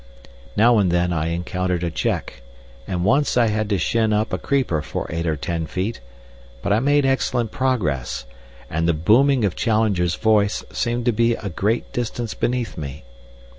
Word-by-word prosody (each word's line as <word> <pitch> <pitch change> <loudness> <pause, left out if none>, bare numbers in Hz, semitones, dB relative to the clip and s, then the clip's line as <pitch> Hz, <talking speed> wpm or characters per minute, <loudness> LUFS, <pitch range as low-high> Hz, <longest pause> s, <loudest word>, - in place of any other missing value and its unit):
Now 115 +1 +5
and 95 -3 +2
then 90 0 +1
I 80 -1 -1
encountered 90 +1 -2
a 85 - -1
check, - - -2 0.5
and 90 -1 -2
once 140 +5 +2
I 120 -2 +4
had 105 0 -1
to 100 - +2
shin 110 +3 +1
up 105 +1 0
a - - 0
creeper 130 - 0
for - - -4
eight 85 +1 -2
or 80 - +1
ten 80 +2 -3
feet, 95 - -3 0.6
but 100 - +1
I 105 - +3
made 145 +2 +3
excellent 125 -4 0
progress, 75 - -1 0.4
and 80 +2 -1
the 85 - +2
booming 120 - +4
of 95 - -1
Challenger's 105 -6 +1
voice 105 -2 +2
seemed 120 0 -1
to 120 - +4
be 115 +1 +2
a 105 - -5
great 105 +7 -1
distance 120 -1 -3
beneath 120 -4 -2
me. 70 0 -7
105 Hz, 175 wpm, -22 LUFS, 85-120 Hz, 0.6 s, Now